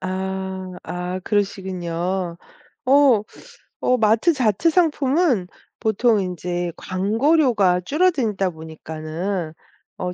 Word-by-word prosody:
아, 190 0 -4
아, 180 +1 -4
그러시군요. 185 -3 -2 0.5
어 265 -5 +5 0.6
어 250 - +3
마트 225 +10 +3
자체 255 - +2
상품은 295 - +2 0.3
보통 220 +1 +2
인제 175 -1 -3
광고료가 210 - +2
줄어들다 255 - +1
보니까는 160 +2 -5 0.4
어 180 -1 -3
190 Hz, 195 characters per minute, -22 LUFS, 180-245 Hz, 0.6 s, 어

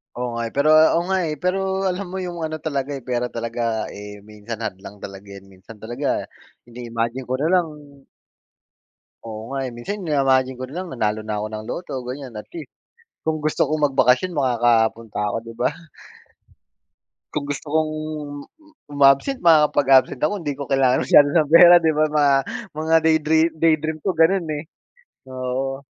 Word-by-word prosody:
Oo 125 0 -3
nga, 115 0 -3
eh. - - -9
Pero 145 +2 +2 0.3
oo 170 - +2
nga, 190 - +2
eh. 150 - -3
Pero 185 +1 +1 0.3
alam 185 +1 -5
mo 185 - -8
'yung 175 -1 -6
ano 155 -1 -3
talaga, 145 -2 -3
eh, 135 - -8
pera 125 -1 -2
talaga, 115 -1 -3
eh, 105 0 -10
minsan 105 +2 -8
hadlang 95 +1 -7
talaga 100 +1 -9
'yan. 100 -1 -11
Minsan 95 +4 -14
talaga 120 +6 -3 0.4
ini-imagine 120 +1 -5
ko 130 - -1
na 150 +4 -1
lang 180 -3 +3 1.6
Oo 110 -1 -7
nga, 135 0 -3
eh. 125 - -5
Minsan, 200 +12 -5
ini-imagine 135 -4 +1
ko 130 - -4
na 140 - -11
lang, 185 0 -4
nanalo 110 -3 -1
na 105 -1 -4
ako 105 - -3
ng 110 0 -6
Lotto, 175 - -6
ganiyan. 130 -2 -7
At 105 - -8
least, 335 - -9 0.5
kung 160 0 0
gusto 155 - +1
kong 155 0 -1
magbakasyon, 130 +7 +3
makakapunta 115 -4 +1
ako, 105 - -2
'di 115 0 -10
ba? - - +1 1.6
Kung 145 -1 -2
gusto 145 +1 -5
kong 155 -1 +1 1.0
umabsent, 140 - +3
makakapag-absent 145 -6 +4
ako. 155 +7 +1
Hindi 145 -3 -3
ko 140 - -4
kailangan 135 -2 +3
masyado 145 +3 +6
ng 155 -3 +2
pera, 175 +1 +9
'di 160 -1 +3
ba? 155 0 +3
Mga 150 -1 +3 0.5
mga 160 +1 +1
day 160 0 +5
dream 160 +1 +3
day 165 -1 +5
dream 155 0 -3
ko 195 - 0
gano'n, 165 +2 +3
eh, - - -7 0.7
oo. 130 +2 -4
135 Hz, 175 wpm, -21 LUFS, 115-155 Hz, 1.6 s, pera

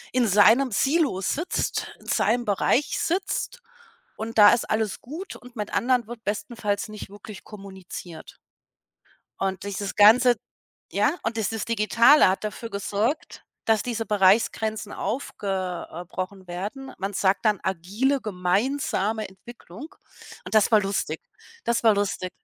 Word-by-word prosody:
in 245 -3 +3
seinem 220 +7 +5
Silo 270 - +1
sitzt, 310 - -2
in - - -19
seinem 240 +2 +1
Bereich 210 +7 +1
sitzt 390 +7 -2 0.5
und 225 +1 -5
da 205 +2 +9
ist 235 - -1
alles 215 -2 -1
gut 325 +10 -8
und 250 0 -15
mit 210 -2 -5
anderen 245 -2 +2
wird 235 -1 -10
bestenfalls 210 0 -2
nicht 210 -2 -9
wirklich 205 0 -11
kommuniziert. 190 -5 -10 1.0
Und 190 0 -2
dieses 200 0 -4
Ganze 235 +4 +7 0.6
ja? - - +2
Und 225 0 -2
dieses 220 0 -1
Digitale 230 +4 +5
hat 190 +3 -1
dafür 225 +2 -5
gesorgt, 205 +7 -2 0.2
dass 220 -1 +2
diese 230 -2 -3
Bereichsgrenzen 210 +1 +2
aufge 190 -7 -3
äh, 175 +2 -7
brochen 185 +1 -6
werden. 205 +10 -6
Man 195 +2 -3
sagt 195 +2 +1
dann 210 -3 +3
„agile 200 +10 0
gemeinsame 210 +2 -1
Entwicklung” 230 - -12 0.6
und - - -6
das 215 +2 +5
war 215 -2 +6
lustig. 195 0 -2 0.4
Das 235 0 0
war 220 -2 +5
lustig. 195 -2 -2
215 Hz, 135 wpm, -25 LUFS, 195-235 Hz, 1.0 s, da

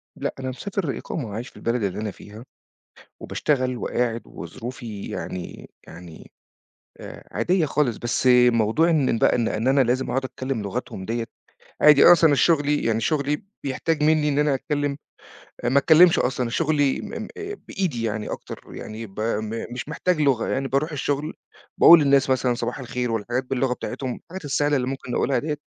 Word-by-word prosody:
لأ - - -3
أنا 130 0 -4
مسافر 180 +2 -3
إقامة، 115 -10 -5
عايش 115 +4 -5
في - - -28
البلد 115 -1 -1
اللي 100 +1 -2
أنا 105 -2 -3
فيها، 105 +6 -13 0.7
وباشتغل 130 -4 -1
وقاعد 120 -1 -1
وظروفي 110 +4 -8
يعني 90 -1 -7 0.2
يعني 85 -1 -12 0.7
آآ - - -11
عادية 180 -3 +2
خالص، 135 -6 0
بس 120 +2 -1 0.2
موضوع 115 +9 +2
إن 140 -8 +2
بقى - - +4
إن 115 -2 0
إن 115 +4 -1
أنا 135 0 +4
لازم 130 +2 0
أقعُد 135 +1 -1
أتكلّم 130 -2 -4
لغتهم 95 -1 -5
ديّة، 115 +1 -2 0.6
عادي 150 -2 +7
أصلًا 165 -4 +7
شُغلي 145 -1 +2
يعني 115 0 0
شُغلي 150 - -1 0.2
بيحتاج 150 +3 -1
منّي 155 -1 +3
إن 145 +1 0
أنا 150 -1 +2
أتكلّم 145 +1 -2 0.7
آآ 120 - +1
ما 135 - +2
أتكلّمش 165 +3 +6
أصلًا 125 -1 -1
شُغلي 145 -1 +1
م - - -8
م - - -8 0.4
بإيدي 165 - -2
يعني 110 -1 -3
أكتر، - - -8
يعني 110 +1 -7
ب 95 0 -12
م 110 0 -2
مش 130 +4 -6
محتاج 160 +1 0
لغة، 135 -5 +2
يعني 135 +1 -1
بارُوح 140 +5 0
الشغل 145 +1 -2 0.4
باقول 170 -1 +9
للناس 140 -1 +3
مثلًا 130 -1 +2
صباح 120 +1 -4
الخير 125 -1 -3
والحاجات 120 +4 -2
باللغة 130 0 -1
بتاعتهم، 130 0 -5
الحاجات 180 -2 -9
السهلة 145 +1 +1
اللي 125 -2 0
ممكن 135 -2 -5
نقولها 135 +2 +1
ديّة، 150 -1 -3
130 Hz, 170 wpm, -23 LUFS, 115-150 Hz, 0.7 s, باقول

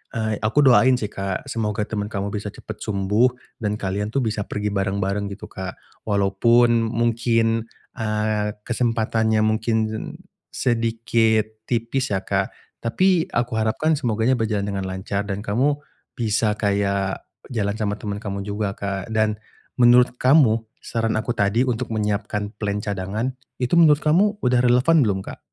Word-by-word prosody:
eee, 110 -2 -1
aku 110 +8 +2
doain 130 0 +6
sih, 105 -4 -3
Kak. 95 -2 -4
Semoga 105 -1 -1
teman 105 -2 -2
kamu 100 -1 -3
bisa 105 0 -3
cepat 110 - -9
sembuh 105 +4 +2 0.3
dan 105 -1 -1
kalian 100 +2 -2
tuh 135 - +1
bisa 105 -2 -2
pergi 105 0 -2
bareng-bareng 100 0 -1
gitu, 100 - -9
Kak. 95 -1 -6 0.3
Walaupun 115 +4 +3
mungkin, 115 -1 +1 0.3
eee, 105 -1 -1
kesempatannya 110 -2 +1
mungkin 110 +1 +1 0.8
sedikit 115 -2 0
tipis 120 +1 -1
ya, 95 - -1
Kak. 95 -1 -1 0.3
Tapi 180 +8 +2
aku 120 0 0
harapkan 110 +9 +1
semoganya 120 -2 +1
berjalan 105 -3 0
dengan 95 -1 -3
lancar 95 +2 -3
dan 100 +1 -3
kamu 130 +8 +1 0.4
bisa 110 -2 +1
kayak 100 -2 0 0.3
jalan 105 -4 -1
sama 105 -2 -1
teman 105 -1 -4
kamu 100 -2 -4
juga, 105 -1 -2
Kak. 100 -1 -4
Dan 110 -1 +2 0.5
menurut 125 +1 +6
kamu 130 -5 +5 0.2
saran 115 -1 -1
aku 120 +2 -2
tadi 105 +3 +2
untuk 125 0 -2
menyiapkan 105 -1 -2
plan 100 -1 -1
cadangan 105 +4 -3 0.3
itu 125 +3 -1
menurut 155 -3 +7
kamu 195 +7 +3
udah 125 0 +3
relevan 125 +6 +4
belum, 100 -4 0
Kak? - - -8
110 Hz, 145 wpm, -22 LUFS, 100-120 Hz, 0.8 s, menurut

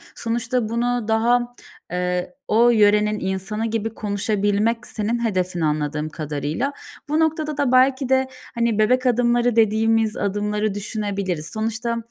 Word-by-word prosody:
sonuçta 235 0 -1
bunu 240 0 0
daha, 240 +2 +1 0.4
eee, 180 0 -1 0.2
o 235 +3 +4
yörenin 210 -1 +3
insanı 190 +4 -3
gibi 225 0 -2
konuşabilmek 210 +2 0
senin 235 +2 -2
hedefin 185 -4 -1
anladığım 150 0 -1
kadarıyla. 155 - -3 0.4
Bu 305 +2 +1
noktada 315 -2 0
da 285 -4 +1
belki 260 0 +3
de 265 0 +3 0.3
hani, 235 -2 +1
bebek 255 +4 +3
adımları 240 -1 +2
dediğimiz 225 0 +2
adımları 210 +1 -1
düşünebiliriz. 200 -6 -3
Sonuçta, 225 +2 -2
220 Hz, 125 wpm, -22 LUFS, 200-240 Hz, 0.4 s, o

